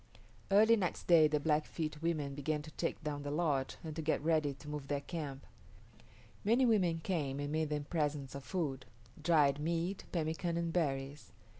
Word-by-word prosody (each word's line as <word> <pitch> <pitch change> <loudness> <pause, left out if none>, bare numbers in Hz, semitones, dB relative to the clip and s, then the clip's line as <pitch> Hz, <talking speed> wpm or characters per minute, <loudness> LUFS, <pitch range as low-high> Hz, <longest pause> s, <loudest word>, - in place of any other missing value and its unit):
Early 215 +3 +6
next 190 -5 -2
day 165 -3 +7
the 150 0 +1
Blackfeet 155 0 -1
women 155 -4 -1
began 150 +2 -2
to 155 - -10
take 165 0 -3
down 145 -1 -3
the 145 - -4
lodge 145 -4 0
and 155 -2 -6
to 160 - -3
get 155 -1 0
ready 155 -3 +2
to 135 +2 -14
move 150 -2 -5
their 145 0 -1
camp. 145 -5 -5 1.0
Many 235 +5 +4
women 180 -8 +2
came 145 -7 -1
and 145 0 -3
made 155 0 0
them 150 -1 -1
presents 145 -4 -2
of 140 -1 -7
food, 140 -8 -3 0.3
dried 150 -3 +4
meat, 170 +5 -1
pemican, 165 +1 -1
and 170 -1 -1
berries. 140 -3 -2
155 Hz, 175 wpm, -34 LUFS, 145-170 Hz, 1.0 s, day